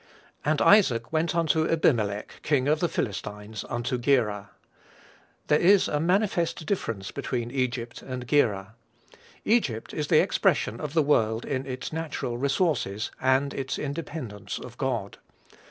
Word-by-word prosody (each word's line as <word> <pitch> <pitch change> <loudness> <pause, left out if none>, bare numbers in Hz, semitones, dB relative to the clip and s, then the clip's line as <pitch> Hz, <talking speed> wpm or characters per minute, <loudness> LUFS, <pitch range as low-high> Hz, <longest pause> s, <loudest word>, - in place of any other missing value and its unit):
"And 150 0 +2
Isaac 130 - +4
went 160 +1 +1
unto 160 -1 +2
Abimelech, 110 -11 +1
King 140 -3 +1
of 155 +1 +3
the 175 - +2
Philistines, 105 0 -4
unto 120 +1 -2
Gerar." 110 -6 +1 1.0
There 150 - +3
is 195 +3 +5
a 150 - 0
manifest 175 -1 +1
difference 115 - -3
between 120 -1 -3
Egypt 125 -2 -2
and 125 -2 -6
Gerar. 110 -7 +1 0.7
Egypt 145 - +1
is 150 -2 -2
the - - +5
expression 115 - +1
of 150 0 -5
the 160 - +4
world 115 -6 +2
in 135 -1 -3
its 130 +3 -5
natural 155 -7 -3
resources, 135 - 0
and 130 +2 +2
its 135 0 -3
independence 140 - -5
of 120 - -9
God. 120 -8 -2
130 Hz, 140 wpm, -26 LUFS, 115-155 Hz, 1.0 s, is